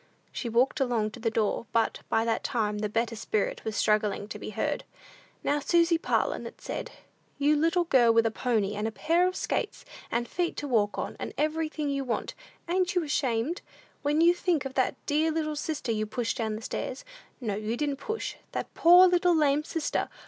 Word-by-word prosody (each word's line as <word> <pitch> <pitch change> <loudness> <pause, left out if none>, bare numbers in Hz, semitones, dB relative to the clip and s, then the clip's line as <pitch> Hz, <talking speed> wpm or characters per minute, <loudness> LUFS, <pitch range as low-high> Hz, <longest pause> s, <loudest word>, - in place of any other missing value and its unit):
She 240 - -4
walked 240 +4 +2
along 235 -5 +1
to 240 - -10
the 225 0 0
door, 220 0 -1
but, 225 -1 +1
by 225 - +2
that 230 - 0
time, 210 -5 -1
the 210 0 -1
better 230 +2 -1
spirit 220 -1 -2
was 220 -1 -3
struggling 210 -1 +1
to - - -6
be - - -6
heard. - - -2 0.6
"Now, 290 +1 +1
Susy 335 +3 +3
Parlin," - - 0
it - - -12
said, - - -5 0.5
"you 290 +2 +3
little 330 +4 +2
girl 255 -8 +5
with 230 0 +4
a 225 - +2
pony, 220 -4 0
and 210 +1 -2
a - - -3
pair 340 +9 +2
of 370 - -3
skates, 420 - -2 0.2
and 240 +1 -1
feet 345 +5 -2
to 290 - -3
walk 215 -5 +1
on, - - -4
and - - -5
everything 310 0 -1
you 275 -1 -1
want, 245 -3 -2 0.3
ain't 365 +1 +1
you 355 - +2
ashamed, 280 +1 0 0.4
when 295 +2 +2
you 340 +1 +6
think 345 -5 0
of 270 - -4
that 260 -1 +1
dear 305 +2 +2
little 310 -1 -1
sister 295 -4 -3
you 215 -1 -1
pushed 230 +3 -2
down 220 -3 -2
stairs - - -5 0.3
no, 210 -5 -2
didn't 240 +7 -2
push 440 +9 -4 0.2
that - - -4
poor 355 +2 +8
little 355 -1 +3
lame 295 -1 +3
sister! 325 0 -2
270 Hz, 195 wpm, -28 LUFS, 225-320 Hz, 0.6 s, poor